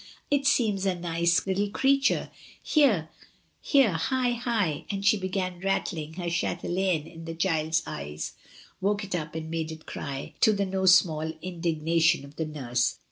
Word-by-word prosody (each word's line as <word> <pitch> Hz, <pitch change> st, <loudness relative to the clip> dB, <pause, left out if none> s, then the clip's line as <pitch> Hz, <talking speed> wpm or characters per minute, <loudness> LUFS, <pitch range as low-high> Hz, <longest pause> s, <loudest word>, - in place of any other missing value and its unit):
"It 280 Hz, -1 st, +2 dB
seems 210 Hz, -8 st, +2 dB
a 185 Hz, -, +1 dB
nice 170 Hz, 0 st, +1 dB
little 195 Hz, +1 st, 0 dB
creature. 270 Hz, +5 st, +2 dB, 0.3 s
Here, 220 Hz, -, +3 dB, 0.5 s
here, 275 Hz, -7 st, +4 dB
hi, 245 Hz, +10 st, 0 dB
hi," 230 Hz, -, -1 dB
and 200 Hz, -1 st, -3 dB
she 205 Hz, -, +6 dB
began 185 Hz, -2 st, -3 dB
rattling 175 Hz, -4 st, -2 dB
her 175 Hz, +1 st, -5 dB
chdieJaine 175 Hz, -1 st, -1 dB
in 165 Hz, 0 st, -10 dB
the 165 Hz, 0 st, -5 dB
child's 160 Hz, -2 st, +1 dB
eyes, 75 Hz, +2 st, -5 dB, 0.5 s
woke 205 Hz, +2 st, +1 dB
it 195 Hz, -, -6 dB
up 160 Hz, -2 st, -3 dB
and 160 Hz, 0 st, -5 dB
made 160 Hz, -1 st, -2 dB
it 160 Hz, 0 st, -10 dB
cry^ 140 Hz, -2 st, -6 dB
to 220 Hz, -, +5 dB
the 200 Hz, -1 st, 0 dB
no 190 Hz, 0 st, -1 dB
small 160 Hz, -4 st, +4 dB
indignation 165 Hz, -3 st, +1 dB
of 140 Hz, +1 st, -15 dB
the 160 Hz, 0 st, -2 dB
nurse. 125 Hz, -5 st, -1 dB
175 Hz, 160 wpm, -27 LUFS, 160-200 Hz, 0.5 s, she